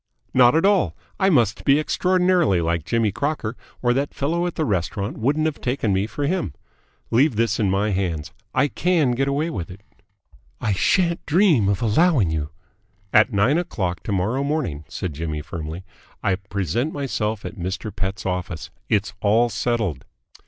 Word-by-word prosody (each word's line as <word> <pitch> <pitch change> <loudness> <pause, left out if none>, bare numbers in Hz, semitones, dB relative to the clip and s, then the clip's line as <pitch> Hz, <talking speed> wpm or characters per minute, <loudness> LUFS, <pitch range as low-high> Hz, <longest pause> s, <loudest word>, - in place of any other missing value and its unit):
"Not 125 0 +6
at 165 - +3
all. 200 -2 +3 0.2
I 190 -1 +4
must 120 - +2
be 140 +1 +5
extraordinarily 180 - +2
like 85 -1 -1
Jimmy 115 -3 +1
Crocker, 140 -3 -2 0.3
or 120 0 +3
that 140 +3 -2
fellow 170 +5 0
at 175 - -5
the 155 - 0
restaurant 100 - -2
wouldn't 145 +7 +1
have 155 -2 -2
taken 120 -5 0
me 95 +2 +1
for 145 +5 -3
him. 140 - -1 0.6
Leave 130 +3 +3
this 115 -1 +1
in 105 -3 +2
my 100 +3 +1
hands. 85 -5 -2 0.2
I 145 - +2
can 165 -3 +1
get 135 +3 0
away 145 +4 0
with 85 - -5
it." 95 +2 -11 0.8
"I 105 - 0
shan't 170 - +2
dream 160 - +4
of 100 +3 0
allowing 115 - +3
you 75 -2 -2 0.3
" 100 -1 -39
"At 110 +4 +5
nine 115 +10 +3
o'clock 95 - -3
to - - -3
morrow 105 +8 0
morning," 115 - -2
said 90 -5 -4
Jimmy 75 0 -4
firmly, 80 +3 -6 0.4
"I 100 - +2
present 100 - -2
myself 110 -7 -2
at 105 - -7
Mr. 95 +3 -4
Pett's 95 0 -3
office. 90 -3 -3 0.2
It's 105 -1 +1
all 115 +4 +3
settled." 110 - -1
110 Hz, 175 wpm, -22 LUFS, 95-145 Hz, 0.8 s, Not